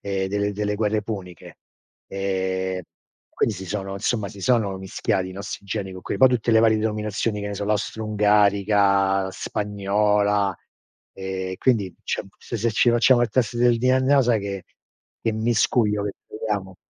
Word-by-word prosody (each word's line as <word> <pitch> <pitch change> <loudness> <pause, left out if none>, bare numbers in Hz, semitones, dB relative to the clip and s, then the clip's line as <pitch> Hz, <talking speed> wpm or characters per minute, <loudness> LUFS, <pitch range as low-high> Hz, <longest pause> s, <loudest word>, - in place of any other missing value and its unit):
ehm, 95 -1 -2
delle 100 +1 -1
delle 105 0 -2
guerre 105 0 0
puniche. 95 -5 -8 0.5
Ehm, 95 -1 -2 0.6
quindi 110 - +2
si 95 0 -8
sono 95 0 -4
insomma 100 +1 -1
si 100 - -11
sono 105 -2 +1
mischiati 95 0 -2
i - - -8
nostri 100 +1 -7
geni 100 -1 -3
con 95 - -10
que - - -3
poi 130 - +7
tutte 120 -2 0
le 110 - +6
varie 110 -1 +4
denominazioni, 105 0 -2
che 105 - -4
ne 100 - -4
so, 100 +1 -4
l'astroungarica, 100 -2 +2
la - - -4
spagnola. 105 0 0 0.6
Ehm, 95 -1 -4
quindi 105 -8 +1
c'è - - -2
un - - -16
se 115 - -6
se 115 +2 +1
ci 120 +2 +4
facciamo 120 +1 +4
il 120 - +1
test 120 -2 0
del 120 -1 +3
DNA 130 +3 +3
o - - +5
sai 115 -3 +2
che 100 -2 -5 0.6
che 115 - 0
miscuglio 110 -1 +1
che 100 - -2 0.2
troviamo? 105 -4 -4
105 Hz, 170 wpm, -23 LUFS, 95-110 Hz, 0.6 s, poi